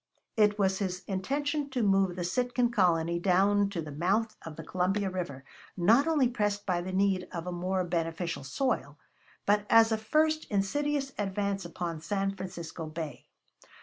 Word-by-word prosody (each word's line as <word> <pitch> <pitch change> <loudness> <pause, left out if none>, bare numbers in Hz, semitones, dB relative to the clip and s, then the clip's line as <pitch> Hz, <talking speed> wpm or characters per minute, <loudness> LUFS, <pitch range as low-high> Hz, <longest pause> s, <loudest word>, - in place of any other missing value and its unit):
It 210 -1 +4
was 190 -2 +1
his 185 -2 -3
intention 285 +9 -1
to 255 -3 -1
move 195 -3 +3
the 180 - -3
Sitkan 245 +5 0
colony 170 -4 +2
down 200 +2 +3
to 175 -5 -4
the 150 - -7
mouth 195 +9 0
of 160 -2 -8
the 160 - -8
Columbia 190 +4 0
River; 155 -8 -4 0.3
not 230 - +4
only 300 -6 +3
pressed 205 -4 -1
by 180 -2 0
the 185 +2 -5
need 190 -1 +1
of 170 -1 -5
a 180 - -3
more 185 +2 -1
beneficent 165 -3 -2
soil, 150 - -1 0.5
but 205 0 +2
as 225 0 +6
a 220 - +1
first 310 +7 +1
insidious 275 +7 0
advance 200 -1 -1
upon 170 -2 -4
San 195 +3 -1
Francisco 170 -3 -6
Bay. 155 -1 -6
195 Hz, 165 wpm, -29 LUFS, 175-220 Hz, 0.5 s, as